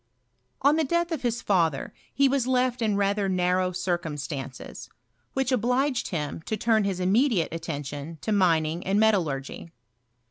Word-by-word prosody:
On 290 Hz, +3 st, +5 dB
the 320 Hz, -, +2 dB
death 340 Hz, +4 st, 0 dB
of 320 Hz, -, -2 dB
his 235 Hz, -2 st, -1 dB
father 165 Hz, -8 st, +1 dB, 0.2 s
he 275 Hz, 0 st, +3 dB
was 265 Hz, -2 st, +1 dB
left 255 Hz, -1 st, +1 dB
in 215 Hz, -3 st, +1 dB
rather 200 Hz, 0 st, +1 dB
narrow 185 Hz, 0 st, +1 dB
circumstances, 155 Hz, -7 st, -4 dB, 0.4 s
which 265 Hz, -1 st, 0 dB
obliged 250 Hz, +2 st, +1 dB
him 150 Hz, -2 st, -4 dB
lo 220 Hz, -, -1 dB
turn 220 Hz, -1 st, +2 dB
hia 195 Hz, -1 st, 0 dB
immediate 190 Hz, -, +2 dB
attention 150 Hz, -1 st, -5 dB
to 220 Hz, -, -2 dB
mining 170 Hz, -4 st, +2 dB
and 195 Hz, +2 st, +1 dB
metallurgy. 170 Hz, -10 st, 0 dB
195 Hz, 145 wpm, -26 LUFS, 165-245 Hz, 0.4 s, On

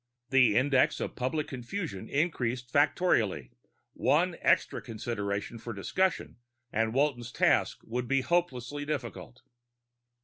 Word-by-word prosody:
The 125 Hz, -6 st, +5 dB
Index 130 Hz, +2 st, +3 dB
of -, -, -4 dB
Public 145 Hz, +4 st, -2 dB
Confusion 125 Hz, -, -5 dB
increased 125 Hz, -6 st, -1 dB
factorially; 140 Hz, -, +2 dB, 0.4 s
one -, -, +2 dB
extra -, -, +2 dB
consideration 105 Hz, -1 st, -4 dB
for 115 Hz, +1 st, -6 dB
discussion 185 Hz, -, -1 dB, 0.4 s
and 110 Hz, 0 st, +1 dB
Walton's 130 Hz, -4 st, 0 dB
task -, -, +2 dB
would 120 Hz, +2 st, -3 dB
be 135 Hz, +1 st, +2 dB
hopelessly 145 Hz, -4 st, -1 dB
difficult. 130 Hz, -3 st, -5 dB
125 Hz, 110 wpm, -29 LUFS, 115-145 Hz, 0.4 s, The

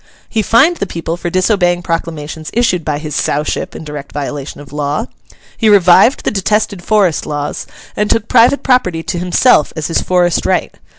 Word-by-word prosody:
He 220 Hz, -, -1 dB
fined 270 Hz, -, +3 dB
the 200 Hz, -, -3 dB
people 165 Hz, -1 st, -4 dB
for 175 Hz, 0 st, -4 dB
disobeying 180 Hz, -1 st, +1 dB
proclamations 160 Hz, -2 st, -4 dB
issued 220 Hz, -8 st, +1 dB
by 150 Hz, -2 st, -2 dB
his 150 Hz, -1 st, -6 dB
Sowship 150 Hz, +2 st, -2 dB
in -, -, -7 dB
direct 150 Hz, -2 st, -8 dB
violation 145 Hz, 0 st, -5 dB
of 145 Hz, -1 st, -13 dB
law. 150 Hz, +8 st, -2 dB, 0.5 s
He 225 Hz, -, +2 dB
revived 200 Hz, +5 st, +5 dB
the -, -, 0 dB
detested 205 Hz, -1 st, -1 dB
Forest 195 Hz, -7 st, +1 dB
laws, 145 Hz, -1 st, -4 dB, 0.3 s
and 210 Hz, 0 st, -1 dB
took 225 Hz, -1 st, 0 dB
private 245 Hz, +3 st, +4 dB
property 180 Hz, -11 st, +1 dB
to 175 Hz, -, -3 dB
himself 180 Hz, -, +3 dB
as 155 Hz, -1 st, -4 dB
his 165 Hz, -, 0 dB
forest 175 Hz, -2 st, +1 dB
right. -, -, 0 dB
175 Hz, 175 wpm, -14 LUFS, 155-210 Hz, 0.5 s, revived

